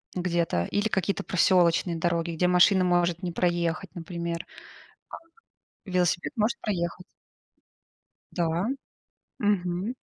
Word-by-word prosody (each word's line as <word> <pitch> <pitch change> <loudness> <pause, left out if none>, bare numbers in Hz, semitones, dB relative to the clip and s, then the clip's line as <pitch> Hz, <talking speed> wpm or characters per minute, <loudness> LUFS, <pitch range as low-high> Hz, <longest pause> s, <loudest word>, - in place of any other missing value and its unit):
где-то 170 - 0
или 205 +1 +1
какие-то 200 -2 -1
проселочные 175 -1 +3
дороги, 170 0 0
где 170 +2 +1
машина 180 +1 +5
может 175 -1 +1
не 175 - -2
проехать, 175 +1 -1
например, 170 0 -4 1.4
а, - - -10
велосипед 180 - 0
может 220 0 0
проехать. 180 -3 -3 1.3
Да, 170 +2 0 0.7
мгм. 195 +1 0
175 Hz, 100 wpm, -27 LUFS, 170-185 Hz, 1.4 s, машина